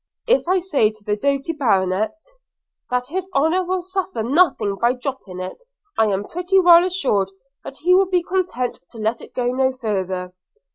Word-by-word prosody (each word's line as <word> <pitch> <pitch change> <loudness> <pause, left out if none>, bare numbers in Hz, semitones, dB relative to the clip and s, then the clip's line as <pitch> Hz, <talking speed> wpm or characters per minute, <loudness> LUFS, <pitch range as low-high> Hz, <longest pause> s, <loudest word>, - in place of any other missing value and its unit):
– - - -51
If - - -4
I 370 +1 +3
say 310 - +2
to 215 -1 -16
the 210 0 0
doughty 280 +6 -1
baronet, 215 - 0 0.7
that 250 +1 -1
his 375 +3 -4
honour 320 +7 +2
will 365 0 -2
suffer 375 - -3
nothing 235 - +2
by 235 +3 +2
dropping 250 -8 -6
it, 185 - -6 0.3
I 220 - +3
am 200 -1 0
pretty 360 +3 +1
well 345 -1 +7
assured 270 - 0 0.3
that 270 - -9
he 360 +3 +3
will 380 0 +4
be 360 -2 +2
content 345 -10 -2
to 235 - -13
let 220 +2 -1
it - - -13
go 245 -1 0
no 260 +1 +1
farther. 190 -7 -3
265 Hz, 185 wpm, -21 LUFS, 215-360 Hz, 0.7 s, well